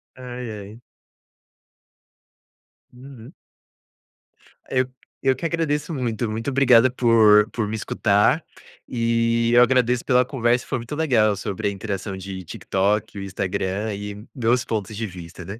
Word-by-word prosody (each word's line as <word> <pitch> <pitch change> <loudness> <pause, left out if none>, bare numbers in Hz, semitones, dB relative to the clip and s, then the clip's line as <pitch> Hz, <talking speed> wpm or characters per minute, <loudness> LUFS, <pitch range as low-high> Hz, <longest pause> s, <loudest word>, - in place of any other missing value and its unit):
Ai 125 -1 -7
ai. 105 +2 -10 2.1
Uhum. 125 -2 -13 1.4
Eu 130 0 +1 0.3
eu 130 -1 +2
que - - -6
agradeço 165 -1 -1
muito 120 -5 -2
muito 115 +5 -3
obrigado 130 -3 +5
por 110 -3 +5
por 110 -3 -2
me 110 - -3
escutar 105 +6 +2 0.5
e, 115 0 +1
eu 120 - +7
agradeço 125 -1 +3
pela 125 0 +4
conversa. 125 -2 0
Foi 130 - -2
muito 120 +5 -6
legal 120 -10 +2
sobre 100 +2 -3
a - - 0
interação 100 0 -5
de 95 0 -7
TikTok, 100 +5 -1
e - - -4
o - - -5
Instagram 95 +2 -2
e 105 +1 -7
meus 120 -2 +1
pontos 110 -1 -4
de 115 +2 -3
vista, 90 -2 -9
né. 100 +5 -8
115 Hz, 140 wpm, -23 LUFS, 105-125 Hz, 2.1 s, eu